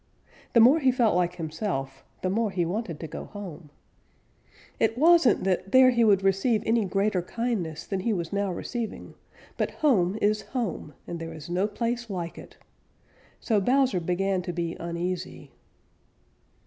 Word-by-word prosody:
The 235 - +6
more 255 +8 +7
he 265 -4 +3
felt 240 -6 +2
like 180 -1 +1
himself, 155 -5 -4 0.2
the 185 - +1
more 220 +2 +1
he 180 -3 -1
wanted 175 -3 -3
to 160 - -5
go - - -7
home. 180 -7 -9 1.1
It 225 +1 +1
wasn't 330 -1 +5
that 190 0 -1
there 260 0 +7
he 235 -1 +2
would 200 -3 +4
receive 200 +3 +2
any 225 -1 +2
greater 195 0 0
kindness 180 -6 -3
than 195 - -3
he 225 +5 -1
was 170 -4 -3
now 200 -1 0
receiving, 225 +5 -5 0.4
but - - 0
home 205 -10 +1
is 210 0 +1
home 205 - -4
and 170 - -6
there 165 0 -6
is 160 +2 -9
no 185 +3 +1
place 235 +2 -3
like 175 -4 -5
it. - - -14 0.8
So 215 -4 +1
Bowser 255 -2 +2
began 185 +2 0
to 175 0 -4
be 170 -1 -3
uneasy. 170 -3 -4
195 Hz, 160 wpm, -26 LUFS, 175-230 Hz, 1.1 s, more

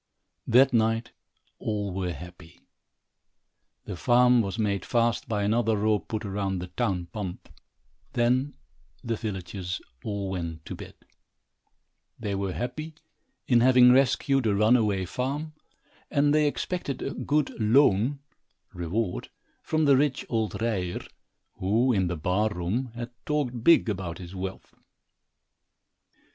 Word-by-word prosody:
That 130 +2 +5
night 115 0 +1 0.5
all 105 -3 -2
were 90 -1 -2
happy. 90 -1 -11 1.2
The - - -5
farm 125 +6 +4
was 100 0 -3
made 100 -3 0
fast 120 -2 +1
by 105 -2 0
another 110 +1 +2
rope 105 0 +1
put 110 0 -3
round 95 -1 -2
the 90 0 -6
town 95 -3 -1
pump. 100 -5 -5 0.7
Then 125 +4 +1 0.5
the 115 -1 -1
villagers 95 -3 -4 0.2
all 100 -3 -3
went 85 -4 -5
to - - -6
bed. - - -10 1.2
They 100 - -3
were 95 -1 -2
happy 155 +6 -5 0.5
in 120 -2 +5
having 125 0 +7
rescued 135 0 +3
a 105 - +2
runaway 105 -3 +3
farm, 140 - -3 0.6
and 145 0 +3
they 150 -1 +4
expected 145 -2 -3
a 135 - -2
good 150 -1 0
"loon" 120 +3 +3 0.5
(reward) 90 +3 -2 0.3
from 155 0 0
the 140 -1 +6
rich 140 -2 +1
old 110 -3 -1
Ryer, 100 -6 -1 0.6
who, 115 +7 +2
in 95 -4 +1
the 85 -1 -3
barroom, 95 - 0
had 120 0 -6
talked 125 -6 -2
big 165 -3 +6
about 90 -5 -3
his 90 0 -9
wealth. 95 0 -6
110 Hz, 130 wpm, -27 LUFS, 95-125 Hz, 1.2 s, having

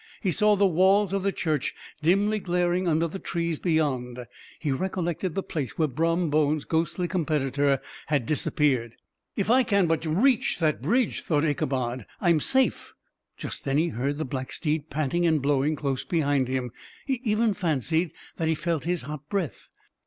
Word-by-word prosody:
He 190 - 0
saw 210 +5 +4
the 200 0 +3
walls 190 +2 +3
of 195 - +1
the 195 +1 +1
church 155 -7 -1 0.3
dimly 200 +6 +2
glaring 180 0 0
under 165 0 +2
the 190 +4 -7
trees 170 -4 -2
beyond. 130 -7 -1 0.3
He 150 - -1
recollected 175 +2 -2
the 195 - -1
place 145 -6 -4
where 160 - +2
Brom 165 +3 0
Bones's 150 0 +2
ghostly 170 +2 0
competitor 145 -5 +1 0.3
had 140 -5 +1
disappeared. 130 -5 0 0.4
"If 200 +2 0
I 255 +2 +6
can 200 -6 +2
but 165 -1 0
reach 230 - +2
that 155 -6 0
bridge," 230 - +1
thought 150 -1 +1
Ichabod, 130 -5 -1
"I 175 - +3
am 160 - +4
safe." 265 - 0 0.4
Just - - -6
then 135 0 0
he 165 +3 +2
heard 140 +2 -2
the 155 - -2
black 130 0 -5
steed 155 -1 -2
panting 155 +4 0
and 160 -2 +3
blowing 140 +2 +1
close 135 -3 -2
behind 145 -6 +1
him; 130 -2 -2 0.3
he 265 -4 -1
even 220 -1 +2
fancied 165 - 0 0.3
that 160 - -1
he 160 - +2
felt 165 -1 -2
his 175 -3 -1
hot 150 +1 -8
breath. 190 -7 -3
160 Hz, 175 wpm, -26 LUFS, 145-185 Hz, 0.4 s, I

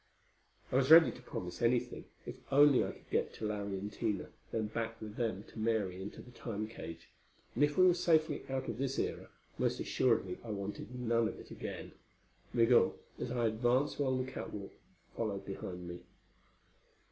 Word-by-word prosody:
I 125 - +3
was 135 0 +3
ready 160 +1 +10
to - - -12
promise 90 -7 -6
anything, 120 +1 +1 0.2
if - - -6
only 145 -1 +7
I - - -2
could - - -17
get - - 0
to 110 - -4
Larry 100 -2 -2
and 100 +2 -5
Tina, 105 -5 -2 0.2
then 110 -1 0
back 115 +1 -3
with 105 -1 -7
them 110 -5 -1
to - - -10
Mary 105 -5 0
into 100 - -7
the 125 - -14
Time 110 -3 -4
cage; 85 -7 -9 0.4
and 135 - +2
if 145 0 +2
we 185 - +7
were 180 - +7
safely 160 -3 +2
out 130 0 -2
of 115 - -4
this 135 0 -1
era, - - -2 0.3
most - - +1
assuredly 110 -7 +1
I 115 - -8
wanted 105 +4 -5
none 115 -1 +2
of - - -6
it - - -12
again. - - -6 0.6
Migul, 120 0 +4 0.2
as - - -3
I 120 -1 0
advanced 120 +6 +2
along 130 -2 +1
the 130 - -8
catwalk, 100 -2 -6 0.4
followed 100 -4 -2
behind 90 -2 -6
me. 85 0 -6
115 Hz, 180 wpm, -34 LUFS, 105-130 Hz, 0.6 s, ready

